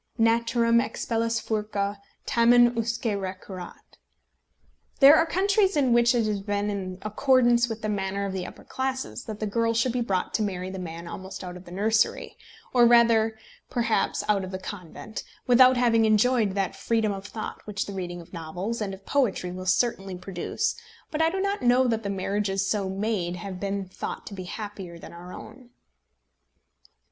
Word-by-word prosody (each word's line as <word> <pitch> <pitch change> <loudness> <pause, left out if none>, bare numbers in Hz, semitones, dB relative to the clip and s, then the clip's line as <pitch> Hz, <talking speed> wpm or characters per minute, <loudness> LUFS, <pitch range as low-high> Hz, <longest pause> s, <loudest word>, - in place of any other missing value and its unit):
"Naturam 230 0 +3
expellas 230 -2 -1
furcâ, 210 -2 -2 0.3
tamen 240 +1 +5
usque 230 -1 -1
recurret." 185 -1 -8 1.0
There 280 +2 +9
are 325 +1 +3
countries 390 +1 +2
in 260 -4 +3
which 235 +1 +4
it 230 -2 +2
has 210 -2 -1
been 205 +1 -1
in 185 -2 -4
accordance 240 +1 +3
with 225 0 -6
the - - 0
manners 200 -1 -2
of 195 - -3
the 185 -2 -3
upper - - -12
classes 260 -1 -4
that 215 -2 -6
the 215 - -1
girl 230 +2 0
should 230 +2 +2
be 245 +1 -1
brought 195 -6 -1
to - - +1
marry 185 -3 -2
the 190 - -6
man 170 -1 -7
almost 190 +2 -7
out 180 -1 -7
of 180 +1 -11
the 175 - -12
nursery 215 +4 +1 0.4
or 240 -2 +6
rather 230 -2 +4 0.3
perhaps 235 -2 0
out 205 -2 +2
of 185 - -5
the 185 - -4
convent 190 +2 -8 0.2
without 255 +1 +6
having 230 -2 +4
enjoyed 220 -1 +3
that 195 -2 -1
freedom 225 -2 0
of 195 0 -6
thought 215 +1 -6
which 210 +2 -2
the 200 - -7
reading 175 -2 -5
of 170 - -17
novels 180 +7 -4
and 195 -2 -2
of 195 - -20
poetry 225 -10 0
will 185 +1 -7
certainly 195 -2 +1
produce; 180 -1 -2 0.4
but 310 - -1
I 320 - +4
do 380 +3 -3
not 400 +1 -1
know 250 +1 +4
that 225 -2 0
the 200 - -4
marriages 195 0 -1
so 200 -2 0
made 190 -3 -1
have 185 +1 -7
been 200 0 -3
thought 185 - -6
to - - -8
be 185 -2 -6
happier 195 -3 -7
than 170 - -11
our 175 +1 -10
own. 240 +5 -11
215 Hz, 180 wpm, -26 LUFS, 190-235 Hz, 1.0 s, There